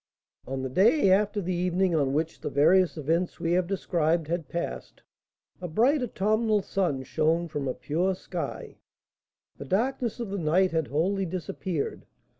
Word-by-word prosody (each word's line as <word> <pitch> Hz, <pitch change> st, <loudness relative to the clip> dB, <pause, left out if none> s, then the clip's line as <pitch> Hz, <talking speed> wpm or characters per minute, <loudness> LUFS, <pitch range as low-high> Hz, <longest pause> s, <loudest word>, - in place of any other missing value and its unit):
On 135 Hz, 0 st, -3 dB
the 130 Hz, -, -2 dB
day 195 Hz, -, +4 dB
after 205 Hz, +1 st, +2 dB
the 185 Hz, 0 st, -2 dB
evening 180 Hz, +1 st, +1 dB
on 140 Hz, -4 st, +2 dB
which 155 Hz, +3 st, -2 dB
the -, -, -3 dB
various 175 Hz, +5 st, +3 dB
events 165 Hz, +4 st, -1 dB
we 165 Hz, -, -1 dB
have 180 Hz, 0 st, +2 dB
described 170 Hz, -4 st, 0 dB
had 170 Hz, -2 st, -2 dB
passed, 65 Hz, -, -5 dB, 0.6 s
a 180 Hz, -, -3 dB
bright 250 Hz, -, +2 dB
autumnal 215 Hz, -2 st, +1 dB
sun 175 Hz, -11 st, -1 dB
shone 160 Hz, +5 st, 0 dB
from 145 Hz, -3 st, -4 dB
a 130 Hz, -, -2 dB
pure 180 Hz, +5 st, -1 dB
sky; -, -, -6 dB, 0.8 s
the -, -, -6 dB
darkness 235 Hz, +3 st, -1 dB
of 230 Hz, -5 st, -4 dB
the 200 Hz, -, -2 dB
night 180 Hz, +4 st, +2 dB
had 160 Hz, -3 st, 0 dB
wholly 185 Hz, +6 st, 0 dB
disappeared. 175 Hz, -1 st, -4 dB
175 Hz, 160 wpm, -27 LUFS, 155-195 Hz, 0.8 s, day